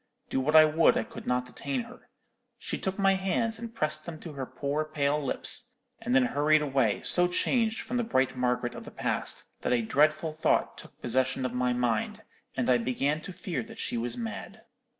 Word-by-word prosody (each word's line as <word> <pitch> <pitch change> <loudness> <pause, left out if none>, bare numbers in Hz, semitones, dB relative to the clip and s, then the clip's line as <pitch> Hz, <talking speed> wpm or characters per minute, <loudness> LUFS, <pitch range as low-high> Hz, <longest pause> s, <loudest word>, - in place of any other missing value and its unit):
Do - - +1
what 150 +4 +1
I 155 0 +10
would, 155 +2 +4
I - - +1
could - - -10
not 125 0 +1
detain 130 +1 -3
her. - - -13 0.5
She - - -4
took 190 0 -3
my 195 -1 +4
hands, 195 +4 -1
and 230 -1 -6
pressed 155 -7 -2
them 160 -2 -6
to 165 - -8
her 135 -2 -5
poor 145 +2 -2
pale 150 -1 0
lips, 245 - 0 0.2
and 240 +2 -1
then 255 0 +5
hurried 155 -6 +3
away, 135 -7 +1
so 180 0 +3
changed 225 +5 +1
from 245 +2 -3
the 240 - +1
bright 130 - +1
Margaret 125 -1 0
of - - -8
the - - -9
past, - - -1 0.2
that - - -1
a 120 -2 +2
dreadful 155 +6 +2
thought 155 - +1
took - - -13
possession 130 +2 +1
of 125 - -2
my 125 0 +1
mind, 120 -3 -1 0.3
and - - 0
I 125 -1 +4
began 135 +6 0
to 190 - -8
fear 180 -1 -4
that 225 0 -11
she - - -2
was 120 +1 -2
mad.' 110 -3 -6
150 Hz, 210 wpm, -29 LUFS, 125-185 Hz, 0.5 s, I